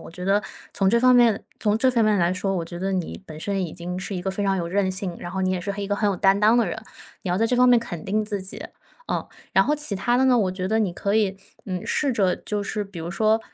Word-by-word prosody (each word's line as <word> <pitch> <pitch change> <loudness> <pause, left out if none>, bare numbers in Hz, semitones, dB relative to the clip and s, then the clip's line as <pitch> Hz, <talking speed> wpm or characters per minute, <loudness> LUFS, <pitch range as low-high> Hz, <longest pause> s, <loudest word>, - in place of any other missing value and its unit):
我 - - -11
觉 180 +2 -8
得 200 +2 +3 0.3
从 195 -1 +2
这 235 +3 +4
方 255 +1 +6
面 235 -4 +4 0.2
从 210 -1 +1
这 255 +3 +3
方 230 -3 +2
面 215 -1 +3
来 175 +1 +2
说， 195 +1 -1
我 170 -2 -2
觉 175 +1 -7
得 195 +1 -2
你 185 0 -3
本 155 -1 -9
身 200 +1 -1
已 - - -9
经 180 +1 -5
是 190 +1 -5
一 180 - -4
个 190 - -1
非 200 +1 -2
常 195 -1 +2
有 170 -2 -2
韧 195 +1 +1
性， 185 -2 -4
然 175 - -7
后 190 +1 -3
你 185 - +1
也 185 -1 -1
是 200 +2 -3
很 200 0 -5
一 200 - -4
个 205 - 0
很 210 -1 +1
有 195 - +1
担 195 +2 +4
当 215 +3 +5
的 235 - +4
人， 200 +5 -4 0.4
你 185 - -4
要 180 - +1
在 225 - +2
这 250 - +1
方 250 0 +5
面 240 -1 +6
肯 175 -9 -7
定 215 +2 0
自 205 -2 -3
己， 190 - -7 0.4
嗯。 - - -2 0.3
然 - - +5
后 300 - +2
其 295 -9 -3
它 240 +6 +1
的 260 - +3
呢， 250 -2 +5
我 185 -3 +1
觉 185 0 -3
得 220 +1 +2
你 200 -5 +1
可 200 +4 -1
以， 195 -3 +1 0.3
嗯， 185 -2 -4
试 280 -4 0
着 190 -5 +2
就 210 -1 -3
是 210 +1 -3
比 195 -4 -9
如 165 +2 -5
说， 220 +3 +2
200 Hz, 330 characters per minute, -24 LUFS, 185-220 Hz, 0.4 s, 方